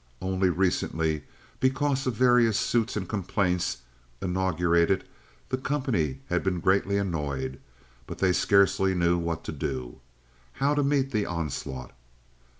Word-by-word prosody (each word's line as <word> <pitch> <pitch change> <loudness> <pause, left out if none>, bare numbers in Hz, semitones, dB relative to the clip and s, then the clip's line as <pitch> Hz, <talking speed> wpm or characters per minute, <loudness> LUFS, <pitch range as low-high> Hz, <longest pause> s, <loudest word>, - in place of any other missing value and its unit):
Only 95 0 +1
recently, 80 -4 0 0.3
because 135 +1 +1
of 125 - 0
various 120 -3 +4
suits 115 0 0
and 95 -3 -3
complaints 90 - -1 0.4
inaugurated, 90 0 +1 0.5
the 130 - -1
company 120 - -1
had 90 0 0
been 90 -2 0
greatly 100 +3 +2
annoyed, 70 -9 -2 0.5
but - - -7
they 95 -1 +2
scarcely 95 0 +3
knew 85 0 +2
what 85 -1 -3
to - - -5
do, 65 -4 -4 0.5
how 140 +2 +1
to 145 -1 +1
meet 140 -1 +1
the 105 -4 0
onslaught. 75 -6 -4
95 Hz, 130 wpm, -27 LUFS, 85-115 Hz, 0.5 s, various